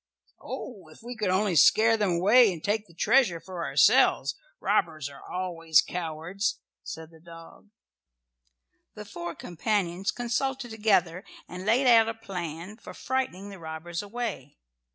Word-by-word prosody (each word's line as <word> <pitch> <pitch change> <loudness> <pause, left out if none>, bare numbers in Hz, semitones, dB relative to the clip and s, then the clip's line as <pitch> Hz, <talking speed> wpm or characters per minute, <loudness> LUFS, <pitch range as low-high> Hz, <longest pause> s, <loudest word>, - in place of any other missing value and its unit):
"Oh, 200 -10 -8
if 155 +7 -17
we 245 +1 -7
could 215 -4 -1
only 190 0 +1
scare 225 +8 +6
them 205 -5 0
away 210 +6 +5
and 165 -3 -8
take 210 +1 -1
the 170 - -19
treasure 190 -3 +3
for 180 0 -7
ourselves! - - +4 0.3
Robbers 155 -4 0
are 140 - -13
always 165 -3 +1
cowards," 175 +5 -3 0.2
said 160 0 -9
the 160 - -17
dog. 165 +4 -14 1.3
The 210 - -8
four 175 -4 -7
companions 185 0 -2
consulted 245 +1 -2
together 195 -5 +1 0.2
and 180 +3 -8
laid 245 +5 +3
out 225 -2 +6
a 225 - -4
plan 180 -2 -7
for - - -11
frightening 255 -7 -3
the 195 - -10
robbers 160 +1 -6
away. 205 - -6
190 Hz, 145 wpm, -27 LUFS, 170-220 Hz, 1.3 s, scare